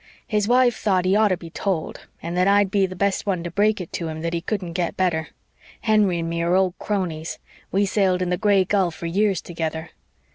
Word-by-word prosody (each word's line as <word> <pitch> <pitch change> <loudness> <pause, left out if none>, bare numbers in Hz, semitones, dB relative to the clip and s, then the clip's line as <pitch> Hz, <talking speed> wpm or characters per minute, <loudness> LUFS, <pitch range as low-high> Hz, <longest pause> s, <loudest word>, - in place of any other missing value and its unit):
His 210 -2 0
wife 245 -1 +4
thought 185 -4 +1
he 185 +2 +3
oughter 210 -4 +3
be 170 -1 -11
told 180 -3 -3 0.2
and 170 +1 -4
that 180 +1 +3
I'd 200 -1 +4
be 200 -2 +2
the 185 - -8
best 200 +2 0
one 185 -4 0
to 175 - -5
break 210 +3 +2
it 180 - -8
to 170 - -3
him 160 0 -5
that 170 +1 -2
he 170 - -1
couldn't 185 -2 -3
get 175 -1 -2
better. 170 -4 0 0.5
Henry 210 -5 +3
and 165 0 -2
me 170 0 -2
are 170 +2 +2
old 185 -1 +2
cronies 175 -6 -3 0.3
we 200 +2 +2
sailed 190 -2 +1
in 180 - -2
the - - +3
Gray 200 -2 +3
Gull 190 -2 +2
for 170 +1 -9
years 195 +2 +1
together. 160 -1 -4
185 Hz, 225 wpm, -23 LUFS, 170-200 Hz, 0.5 s, wife